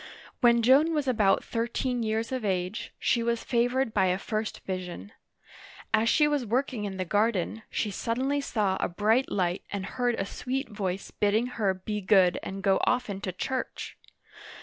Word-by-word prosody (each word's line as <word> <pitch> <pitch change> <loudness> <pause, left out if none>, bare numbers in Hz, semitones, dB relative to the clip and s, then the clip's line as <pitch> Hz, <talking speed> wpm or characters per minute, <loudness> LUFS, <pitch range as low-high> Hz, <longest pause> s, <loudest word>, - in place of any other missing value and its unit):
When 235 -2 +4
Joan 290 +7 +5
was 295 -3 0
about 215 -6 +3
thirteen 240 +2 -2
years 225 +1 -1
of 255 -3 -2
age, 185 0 -2
she 235 - +1
was 235 0 -1
fa 235 -1 +2
vored 260 -2 0
by 190 -2 +3
a 180 0 +1
first 215 +2 -3
vision: 180 - -5 0.8
as 220 +1 +4
she 300 -2 +4
was 295 -3 0
working 240 -1 -1
in 195 -2 -5
the 185 - -2
garden, 210 +2 0
she 210 - -1
suddenly 260 +8 -1
saw 205 -8 0
a - - 0
bright 215 +8 +2
light 180 -2 0
and 200 -2 -3
heard 245 +3 0
a 195 - -2
sweet 260 +6 -3
voice 195 -3 -4
bidding 210 +3 +1
her 215 -6 -1
be 210 +3 -4
good 185 -2 +4
and 195 0 -6
go 195 0 +3
often 210 -6 0
to 185 - -3
church. 255 +8 -4
220 Hz, 175 wpm, -28 LUFS, 195-245 Hz, 0.8 s, Joan